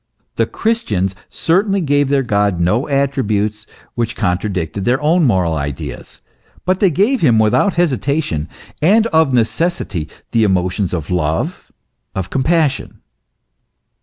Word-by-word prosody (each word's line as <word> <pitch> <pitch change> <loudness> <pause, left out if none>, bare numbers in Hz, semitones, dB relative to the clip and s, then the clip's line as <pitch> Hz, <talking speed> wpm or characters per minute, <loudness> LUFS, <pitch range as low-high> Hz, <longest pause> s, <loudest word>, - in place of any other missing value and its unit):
The - - +1
Christians 105 - -1 0.2
certainly 195 +4 +1
gave 145 -4 +1
their 140 -1 +2
God 100 -5 +1
no 105 +10 +1
attributes 110 -7 0 0.3
which 120 0 -2
contradicted 95 -2 -2
their 125 +5 +2
own 160 +2 +3
moral 95 -9 +2
ideas, 70 -3 -6 0.4
but 185 +1 +1
they 195 - +4
gave 205 - +1
him 120 -8 +4
without 110 - +2
hesitation, 140 - 0 0.3
and 210 +8 +4
of 160 -3 +4
necessity, 115 - -1 0.2
the 115 - +3
emotions 95 -1 0
of 85 -1 -4
love, 80 -3 -2 0.4
of 95 -1 -4
compassion. 150 +1 0
120 Hz, 125 wpm, -17 LUFS, 95-160 Hz, 0.4 s, they